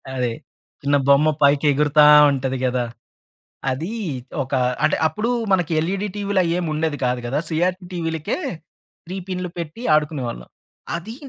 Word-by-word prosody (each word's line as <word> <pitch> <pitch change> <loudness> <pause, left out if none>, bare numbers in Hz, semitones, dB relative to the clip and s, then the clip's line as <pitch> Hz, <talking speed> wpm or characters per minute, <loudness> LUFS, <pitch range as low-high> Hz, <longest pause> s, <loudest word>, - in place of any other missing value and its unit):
అదే. 125 -2 0 0.5
చిన్న 145 0 +2
బొమ్మ 140 +2 +5
పైకి 140 +1 +4
ఎగురుతా 150 +1 +4 0.3
ఉంటది 130 -1 -2
గదా! 125 -1 0 0.9
అదీ 160 - -3 0.5
ఒక 130 +2 -5 0.3
అంటే - - +3
అప్పుడు 215 +9 -3 0.2
మనకి 175 -4 +1
ఎల్‌ఈడీ 195 +5 -2
టీవీలు 200 -2 0
అయ్యేం 170 +1 0
ఉండేది 155 -1 -1
కాదు 125 0 0
గదా! 135 +4 -1
సీఆర్‌పి 180 +3 0
టీవీలకే 165 +2 -2 0.7
3 185 - -6
పిన్నులు 180 -1 -3
పెట్టి 170 +7 -6
ఆడుకునేవాళ్ళం. 140 - -2 0.5
అదీ 215 +7 -7
155 Hz, 135 wpm, -21 LUFS, 140-180 Hz, 0.9 s, బొమ్మ